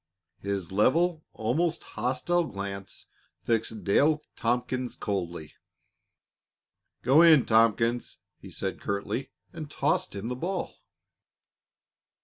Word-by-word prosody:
His 100 -3 -3
level, 160 - +2
almost 155 +10 0
hostile, 130 +10 0
glance 100 -4 -7 0.4
fixed 115 -2 -1
Dale 150 +9 +3
Tompkins 125 +1 -1
coldly. 85 -6 -4 1.5
"Go 135 +6 +6
in, 160 -6 +7
Tompkins," 115 +1 +2 0.2
he - - -11
said - - -4
curtly, 100 +6 -3 0.2
and 155 -3 -7
tossed 170 - 0
him 100 +3 -4
the 125 - -3
ball. 180 +8 -3
120 Hz, 100 wpm, -28 LUFS, 100-155 Hz, 1.5 s, in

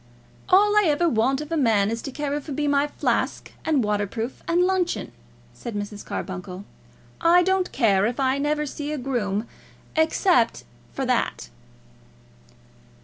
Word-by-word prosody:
"All 410 +3 +5
I 420 -1 +5
ever 310 +3 +2
want 270 +1 +1
of 300 +1 -8
a - - +1
man 220 -6 +3
is 230 0 -3
to 275 - -6
carry 290 +1 -3
for 290 0 -7
me 295 +2 -1
my 285 0 +2
flask, - - -1
and 300 -6 +2
waterproof, 210 +3 -2
and 345 +1 +3
luncheon," 365 -1 0 0.4
said 235 -3 -7
Mrs. 205 0 -5
Carbuncle. 185 0 -6 0.6
"I 345 +2 +5
don't 380 0 +1
care 205 -6 +3
if 245 +3 -4
I 265 0 +1
never 300 +1 0
see 295 +1 -5
a 305 - -2
groom, 235 -6 -2 0.5
except 320 - +2 0.3
for - - -3
that." 60 - -1
275 Hz, 150 wpm, -24 LUFS, 220-320 Hz, 0.6 s, All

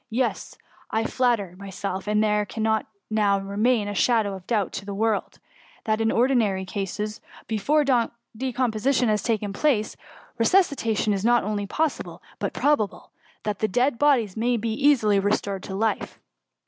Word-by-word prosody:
Yes; 245 +2 -2 0.3
I 220 - 0
flatter 225 -7 0
myself 195 -1 -5
there 210 0 +2
cannot 220 +1 -1 0.2
now 205 -2 +3
remain 205 +3 +1
a 205 - -3
shadow 215 -1 +2
of 190 -2 -10
doubt 210 -6 0
to - - -5
the 200 0 -6
world, 220 0 -1 0.5
that, 215 0 0
in 225 0 +2
ordinary 230 -6 +2
cases, 205 +2 -4 0.2
before 280 +8 +1
de 240 -1 -1
composition 250 +1 +1
has 210 -1 +1
taken 210 -3 -1
place, 220 -3 +1 0.4
resuscitation 230 - +2
is 195 -1 -2
not 240 +1 +4
only 205 0 -2
possible, 315 +8 -2 0.2
but - - -2
probable, 285 -9 0 0.3
and 210 -1 0
th|it 215 - 0
dead 245 +2 +1
bodies 255 -10 +3
may 240 +2 +1
be 225 0 -2
easily 230 -6 +3
restored 200 -1 -1
to 190 - -6
life.'' 215 +1 -1
220 Hz, 150 wpm, -24 LUFS, 205-240 Hz, 0.5 s, not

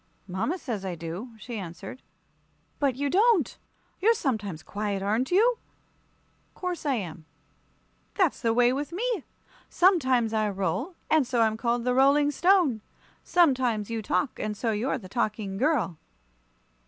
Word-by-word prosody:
"Mama 190 - -2
says 230 - -5
I 185 -2 -3
do," 170 +9 -6
she 230 0 -6
answered. 190 +7 -8 0.8
"But 275 -4 +1
you 285 +2 -1
don't. 390 - +3 0.4
You're 455 +5 +4
sometimes 205 - -2
quiet, 205 0 -3
aren't 220 +6 0
you?" 455 +6 +3 1.0
"'Course 360 -4 -4
I 275 - +2
am." 170 -7 -6 0.9
"That's 370 -7 +1
the 230 - +2
way 245 +2 +4
with 285 +4 -3
me. 435 - -2 0.5
Sometimes 260 - +3
I 215 -1 +1
roll, 205 - -2 0.2
and 310 -5 +4
so 240 -2 +1
I'm 220 -1 +3
called 235 +1 -1
the 250 +1 +1
Rolling 280 +3 +4
Stone. 340 - +3 0.4
Sometimes 255 - +2
you 225 -1 -2
talk, 245 +5 -1
and 210 -1 -3
so 230 0 0
you're 230 +6 -1
the 205 -7 -10
Talking 210 -2 -2
Girl." 255 - +1
245 Hz, 145 wpm, -27 LUFS, 210-295 Hz, 1.0 s, You're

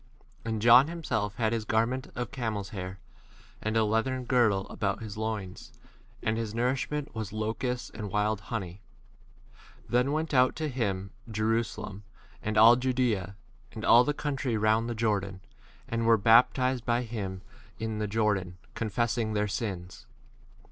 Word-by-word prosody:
And 110 -2 -3
John 120 +4 +8
himself 115 -12 -2
had 110 -1 0
his 115 -1 -1
garment 120 +3 0
of 120 0 -4
camel's 110 -6 -3
hair, 95 -1 -6 0.6
and 110 +1 -1
a 110 - +4
leathern 125 +4 0
girdle 115 -6 +2
about 100 +2 -2
his 105 -2 -7
loins, 110 -4 -5 0.5
and 110 +1 0
his 110 -1 -4
nourishment 135 +4 -1
was 110 -3 -5
locusts 115 +4 -3
and 105 -2 -6
wild 105 +1 0
honey. 95 -4 -4 1.0
5 - - -27
Then 125 +3 +2
went 155 +1 -1
out 125 -1 +4
to 155 -1 -2
him 100 -7 -2 0.2
Jerusa 110 +1 0
lem, 100 +1 -8 0.4
and 110 -1 -2
all 115 +2 +9
Judea, 125 -7 0 0.4
and 110 - -5
all 120 +1 +7
the 145 - 0
6 - - -10
country 135 -5 -1
round 110 +2 +2
the 120 - -3
Jordan, 100 -4 -1 0.5
and 115 0 -1
were 115 -1 +6
baptized 125 +3 +4
by 120 0 0
hfm 100 -5 -5 0.4
in 110 -1 -3
the 105 - -1
Jor 105 0 +2
MATTHEW 95 - 0
III, - - -10
IV. - - -17
dan, - - -29
confessing 115 0 -1
their 105 0 +1
sins. 100 -4 -5
110 Hz, 170 wpm, -29 LUFS, 105-125 Hz, 1.0 s, all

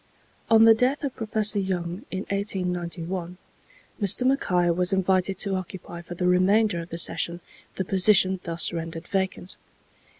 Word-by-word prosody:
On 225 0 +6
the 225 0 +8
death 255 +6 0
of 275 -3 -3
Professor 215 -1 0
Young, 180 -1 -3
in 190 - -4
1891, 180 -2 -3 0.6
Mr. 205 +5 +3
Mackay 180 -10 +2
was 180 +2 +2
invited 190 0 +1
to 200 0 -2
occupy 185 -2 -6
for 175 +1 -9
the 180 - -2
remainder 185 +2 +3
of 165 +1 -8
the 165 - -5
session 170 +1 -1 0.4
the 190 - -2
position 190 0 +3
thus 170 0 -2
rendered 165 0 -6
vacant. 190 -1 -3
185 Hz, 145 wpm, -25 LUFS, 175-200 Hz, 0.6 s, the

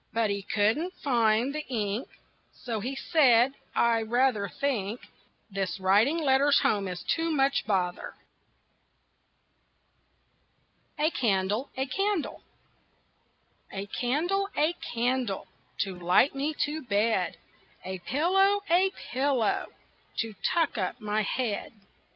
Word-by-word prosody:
But 225 -2 +1
he 200 0 -2
couldn't 220 - 0
find 235 -1 +2
the 305 0 -3
ink, 220 -1 -2 0.5
So 230 -3 -4
he 255 +6 -4
said: 265 -5 +4 0.2
"I 230 -1 +3
rather 225 -3 +1
think 240 -4 -2 0.5
This 195 -1 -2
writing 205 - +3
letters 280 -2 +4
home 200 -2 +1
is 180 -1 -5
too 330 0 0
much 275 -5 +1
bother." 180 -4 -1 2.8
A 305 +3 +2
CANDLE, 210 - 0
A 265 - 0
CANDLE 390 +5 -1 1.3
A 195 0 -4
candle, 330 - -1
a 310 +3 +3
candle 245 - -2 0.4
To 190 -3 -3
light 180 +10 +4
me 285 +3 -2
to 300 +2 -4
bed; 210 - 0 0.5
A 190 0 -5
pillow, 385 - +2
a 370 +3 +5 0.2
pillow 260 -4 +1 0.5
To 225 -2 -2
tuck 330 -9 +1
up 190 +6 -2
my 215 -1 -1
head. 220 +1 -2
240 Hz, 115 wpm, -28 LUFS, 205-290 Hz, 2.8 s, a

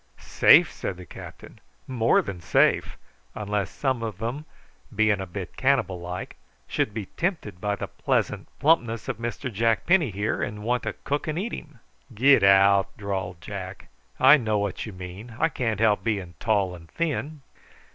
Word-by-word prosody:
"Safe!" - - +5
said 95 - -5
the 90 - -10
captain; - - -12 0.3
"more 120 -3 +2
than 95 -3 -6
safe, 85 - +2 0.4
unless 105 -2 -2
some 130 -4 -1
of 110 -4 -5
'em, 125 +7 -4 0.5
being 110 -2 +2
a 95 - -5
bit 90 0 -7
cannibal 125 -10 +1
like, 90 +1 -6 0.3
should - - -1
be 105 -1 -5
tempted 145 - -3
by 105 0 0
the - - -4
pleasant - - -1
plumpness 120 -7 +2
of - - -3
Mr 120 +2 -4
Jack 115 +1 +1
Penny 175 -6 +4
here, 105 +2 -2
and 105 0 -4
want 125 +2 0
to - - -3
cook 145 +4 -2
and 155 0 -2
eat 215 +6 -3
him." 150 -3 -8 0.4
"Get 135 +5 +5
out!" 95 0 +5
drawled 95 -4 -4
Jack. 95 +2 -8 0.3
"I 135 +4 +8
know 110 -5 0
what 100 +2 -3
you - - -6
mean. 95 +5 -9
I 165 - +2
can't 115 -8 -2
help 110 -2 +3
being 100 -6 -2
tall 100 -4 +1
and 85 -2 -12
thin." 155 -3 -3
110 Hz, 170 wpm, -25 LUFS, 95-130 Hz, 0.5 s, I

